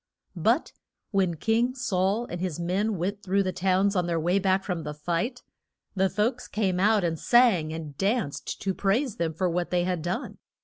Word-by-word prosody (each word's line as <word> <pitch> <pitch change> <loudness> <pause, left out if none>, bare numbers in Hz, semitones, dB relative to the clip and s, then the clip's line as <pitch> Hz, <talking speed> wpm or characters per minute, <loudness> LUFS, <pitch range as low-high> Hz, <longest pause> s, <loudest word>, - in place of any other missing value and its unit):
But - - +1 0.4
when 190 -4 +1
King 230 - +1
Saul 205 -2 0
and 175 -6 -6
his 180 -4 -3
men 190 +5 0
went 195 +4 -2
through 195 +1 +1
the 185 - -1
towns 190 +2 +1
on 180 -2 +1
their 170 -1 0
way 175 +5 +2
back 190 0 +2
from 180 -4 -3
the 150 -1 -6
fight, 175 - -2 0.5
the 190 0 +2
folks 225 +6 -1
came 190 -4 0
out 210 +1 +3
and 165 -2 -1
sang 225 -11 +4
and 155 -3 -6
danced 195 - -1
to 195 - 0
praise 220 +5 0
them 160 -2 -1
for 185 +3 0
what 175 0 -1
they 175 -1 +1
had 180 -2 -1
done. 185 - -4
190 Hz, 190 wpm, -27 LUFS, 175-210 Hz, 0.5 s, sang